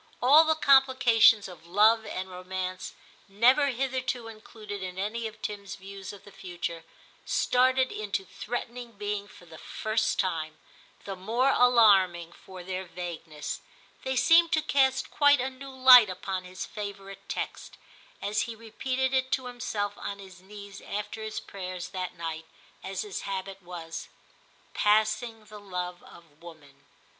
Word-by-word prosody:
All 285 +6 +7
the 315 0 +3
complications 260 -7 +5
of 170 -3 -13
love 215 +5 +4
and 185 +1 -4
romance, 185 0 -5 0.3
never 245 +8 +4
hitherto 255 -2 -2
included 215 -2 -9
in 185 -1 -6
any 220 +4 -2
of 220 0 -12
Tim's 200 -1 -5
views 195 0 -9
of 200 -2 -13
the 205 - -14
future, 175 -3 -6 0.4
started 255 +1 +2
into 200 -2 -3
threatening 240 +3 -6
being 205 0 -4
for 180 - -16
the 160 -2 -13
first 220 0 -1
time, 160 -4 -2 0.5
the 195 - -5
more 230 +8 +1
alarming 195 -10 +4
for 185 +1 -12
their 185 +1 -4
vagueness; 170 -4 -6 0.4
they 265 0 -2
seemed 330 +6 +5
to 315 -1 +2
cast 265 -3 +2
quite 285 -1 +5
a 260 +2 -2
new 270 +1 -10
light 255 -4 +8
upon 185 0 -4
his 185 +1 -6
favourite 195 -1 -8
text, - - -5 0.5
as 210 +1 0
he 230 - -6
repeated 255 +4 -2
it 260 0 +1
to 260 - 0
himself 220 -5 -3
on 200 - -5
his 190 -2 -13
knees 200 0 -11
after 210 +2 -5
his 220 0 -4
prayers 185 -2 -7
that 185 -1 -5
night, 165 -1 -5 0.4
as 190 -1 -4
his 205 -3 -5
habit 195 0 -5
was. 170 -2 -7 0.3
* - - -33
Passing 215 +1 +1
the 210 0 -11
love 180 -3 -5
of 160 -3 -18
woman. 150 -5 -15
205 Hz, 150 wpm, -28 LUFS, 185-245 Hz, 0.5 s, light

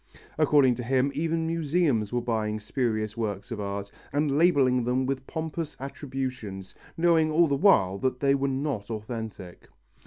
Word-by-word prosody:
According 145 -4 +5
to 125 - -5
him, 130 +3 +1
even 165 +1 -1
museums 160 - +1
were 120 -1 -1
buying 110 -2 -1
spurious 110 -1 -2
works 105 -1 -4
of 115 - -4
art, 100 0 -4 0.2
and 145 0 +1
labelling 140 -7 +4
them 125 +2 0
with 135 0 -3
pompous 160 0 -4
attributions, 130 -8 -5 0.2
knowing 165 -2 +3
all 165 +2 +4
the 140 - 0
while 100 - +4
that 130 +1 -1
they 140 -1 +3
were 140 0 +1
not 135 -6 -2
authentic. 110 -5 -7
130 Hz, 155 wpm, -27 LUFS, 110-150 Hz, 0.2 s, According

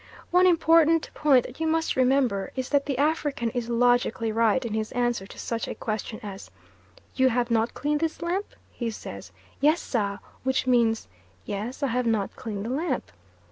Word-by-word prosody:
One 360 +1 +5
important 330 -2 +4
point 275 -5 +4
that 250 - -10
you 320 - 0
must 320 0 +1
remember 255 -6 +2
is 260 -1 -3
that 285 -1 +2
the 275 -3 -1
African 290 -5 0
is 245 -2 -3
logically 240 -1 +2
right 230 +3 +2
in 225 - -3
his 220 0 -2
answer 240 -5 0
to - - -13
such 230 -1 -3
a - - -5
question 215 0 -4
as 195 -2 -8 0.6
"You 260 0 +3
have 240 0 0
not 225 +1 +1
cleaned 295 0 0
this 320 0 -2
lamp?" 370 +4 -2 0.2
he 235 -2 -3
says, 220 - -8 0.3
"Yes, 305 +4 +4
sah" 200 -5 -1 0.3
which 265 0 +1
means, 235 -3 +2 0.4
"yes, 220 +8 -4
I - - +3
have 245 +1 0
not 220 -4 0
cleaned 215 -5 -5
the 235 - -3
lamp." 315 +7 -2
245 Hz, 180 wpm, -26 LUFS, 225-295 Hz, 0.6 s, One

